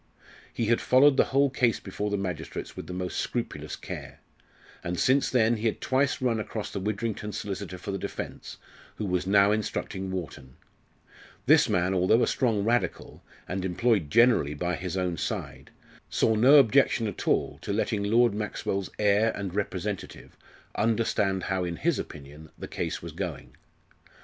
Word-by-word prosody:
He 115 - -2
had 115 +2 +2
followed 135 +2 +5
the - - +4
whole 140 0 +2
case 125 -4 +1
before 105 +1 -4
the 100 - -1
magistrates 90 -5 -5
with - - -7
the - - -7
most 90 0 -3
scrupulous - - -3
care. - - -8 0.6
And 90 0 -3
since 135 +2 +3
then, 120 -2 +3
he 110 +2 -1
had 110 - -1
twice 135 +1 +1
run 120 -3 0
across 110 0 -5
the 100 - -4
Widrington 105 +1 -3
solicitor 100 -2 -5
for 100 - -6
the 95 - -3
defence, - - -6 0.4
who 105 - -4
was 90 -1 -1
now 100 +1 +5
instructing 100 -2 -2
Wharton. 75 -8 -6 0.9
This - - +5
man, 90 +1 +1
although 95 +6 +3
a - - +2
strong 110 -6 +1
Radical, 120 +3 -1 0.3
and 95 0 -3
employed 95 -2 +1
generally 115 - +4
by 90 +4 -1
his 90 0 -4
own 90 -2 -1
side, - - -5 0.4
saw 110 - +2
no 125 +7 +6
objection 135 -3 +5
at 105 - -5
all - - +1
to - - -4
letting 105 - 0
Lord 115 +2 +3
Maxwell's 100 -2 -3
heir 105 +2 +3
and 100 -3 -5
representative 100 -1 -4 0.4
understand 105 -3 +1
how 95 -1 -1
in 85 -1 -3
his 170 - 0
opinion 75 +1 -9
the - - -7
case - - -4
was - - -6
going. - - -6
105 Hz, 165 wpm, -27 LUFS, 90-115 Hz, 0.9 s, no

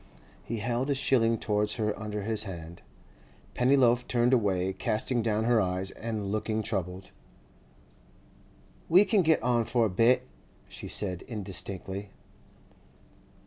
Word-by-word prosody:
He 115 - -4
held 120 +5 -2
a 140 - +2
shilling 115 -4 +2
towards 105 -1 -1
her 105 -2 -1
under 105 -1 -5
his 110 +1 0
hand. 85 -3 -8 0.7
Pennyloaf 125 -1 +3
turned 120 +1 +2
away, 95 -5 +1
casting 115 +5 -1
down 110 -1 0
her 115 -1 +3
eyes 95 0 -2
and 110 -3 -4
looking 110 +1 -1
troubled. 95 -3 -4 1.8
'We 185 +5 +6
can 200 0 +3
get 160 -7 +2
on 120 -1 +2
for 115 0 +1
a - - 0
bit,' 125 +6 +3 0.4
she - - -9
said 90 -4 -1
indistinctly. 100 -2 -3
110 Hz, 130 wpm, -28 LUFS, 100-120 Hz, 1.8 s, We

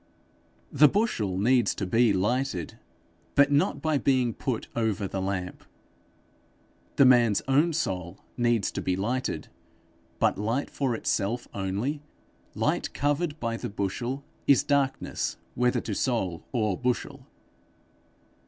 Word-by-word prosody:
The 150 +2 +7
bushel 125 - 0
needs 120 +4 +3
to - - -3
be 115 +4 +3
lighted, 105 - -1 0.6
but 140 0 +5
not 145 +2 +1
by 155 -3 +2
being 130 -4 +2
put 125 -1 -3
over 110 -3 0
the 95 0 -3
lamp. 95 -2 -3 1.3
The 140 - +6
man's 120 -5 +5
own 145 +6 +3
soul 90 - -2 0.2
needs 120 -4 +1
to - - -4
be 90 - 0
lighted, 120 +7 -2 0.7
but - - +1
light 115 +7 -1
for 130 -4 -1
itself 115 +2 -1
only, 100 +10 -2 0.5
light - - -1
covered 145 +2 0
by 115 -1 -2
the - - -5
bushel, 120 +7 -3 0.2
is 140 - +5
darkness 140 -2 -1 0.2
whether 125 0 +1
to 110 - -4
soul 95 -8 -1
or 110 -6 0
bushel. 125 +2 -3
120 Hz, 125 wpm, -27 LUFS, 100-135 Hz, 1.3 s, The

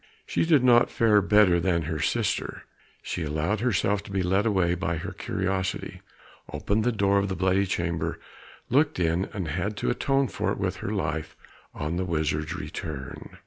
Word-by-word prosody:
She - - 0
did 150 -6 +5
not 120 -1 +5
fare 110 -3 +4
better 100 -3 +5
than 85 -1 +1
her 80 0 -3
sister. 75 - -1 0.4
She 90 - -4
allowed 80 +7 -1
herself 105 -3 +1
to 100 - -10
be 95 -1 0
led 95 +4 +2
away 95 -5 +2
by 85 -1 -2
her 80 - -5
curiosity, 95 -1 -3 0.5
opened 105 +2 0
the 125 - +2
door 100 -2 +2
of 100 0 -1
the 95 - -2
bloody 95 +1 +2
chamber, 85 -2 -2 0.5
looked 145 -3 +3
in, 85 +2 +1
and 95 -7 -5
had 95 +7 -2
to - - 0
atone 135 +2 +1
for - - -2
it - - -2
with - - -2
her - - -4
life 75 +1 -2 0.4
on 75 +3 -3
the 95 - -1
wizard's 80 -1 -1
return. 75 -6 -7
95 Hz, 180 wpm, -26 LUFS, 85-105 Hz, 0.5 s, did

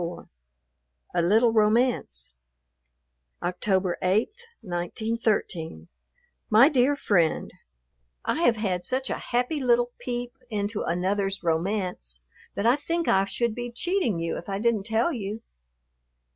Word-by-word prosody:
XXIV 170 +1 -5 0.9
A 175 - +2
LITTLE 220 +7 +4
ROMANCE 215 - +1 1.1
October 180 +1 0
8, 190 +5 +2 0.3
1913. 175 - -2 0.6
MY 230 +6 +7
DEAR 275 0 +3
FRIEND, 175 - +1 0.7
I 325 - 0
have 240 -9 +4
had 190 -5 -1
such 260 +7 -1
a - - -2
happy 250 +5 -1
little 245 -1 +3
peep 245 0 -4
into 205 -1 -2
another's 195 +2 -1
romance 170 - -1 0.4
that 200 - -2
I 240 +4 +5
think 335 +3 -2
I 195 0 +4
should 235 +3 -1
be 245 +1 -5
cheating 345 - 0
you 165 0 -2
if 175 - -11
I 195 - -1
didn't 220 -1 0
tell 225 +8 +1
you. 215 -1 -5
215 Hz, 125 wpm, -26 LUFS, 180-240 Hz, 1.1 s, MY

